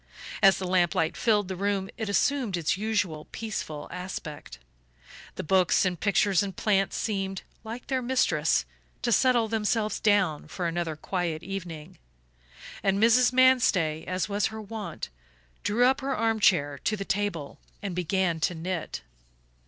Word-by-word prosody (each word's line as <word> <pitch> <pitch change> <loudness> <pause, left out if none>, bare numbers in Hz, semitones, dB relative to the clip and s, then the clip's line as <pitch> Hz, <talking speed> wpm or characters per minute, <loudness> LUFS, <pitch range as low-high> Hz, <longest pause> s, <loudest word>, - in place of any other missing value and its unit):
As 195 -1 +6
the 190 - -4
lamp 180 -2 +2
light 160 0 +1
filled 210 -4 +2
the 190 - -4
room 195 0 -1
it 220 -3 -4
assumed 235 -2 +1
its 165 -2 0
usual 195 -7 -1
peaceful 175 -9 -5
aspect. 180 -4 -7 0.8
The - - -4
books 185 +2 +3
and 180 -2 -1
pictures 200 -2 +3
and 195 -2 -4
plants 195 -2 +1
seemed, 195 -3 -2 0.2
like 230 +2 -7
their 260 -1 -1
mistress, 165 - +2 0.4
to 235 - +1
settle 240 0 +4
themselves 215 0 0
down 190 -8 +2
for 175 +3 -4
another 165 -1 -2
quiet 170 0 -3
evening, 175 -5 -7 0.8
and 195 0 +2
Mrs. 235 +3 +5
Manstey, 235 -12 +3
as 185 -1 -1
was 205 0 0
her 220 0 -7
wont, 215 - -6 0.5
drew 230 +4 +2
up 265 +2 +3
her 270 0 -2
armchair 185 -11 +2
to 215 - -1
the 195 - -4
table 195 -8 -2 0.2
and 195 -2 -3
began 180 -1 0
to 175 +2 0
knit. 165 - -4
195 Hz, 150 wpm, -27 LUFS, 175-220 Hz, 0.8 s, As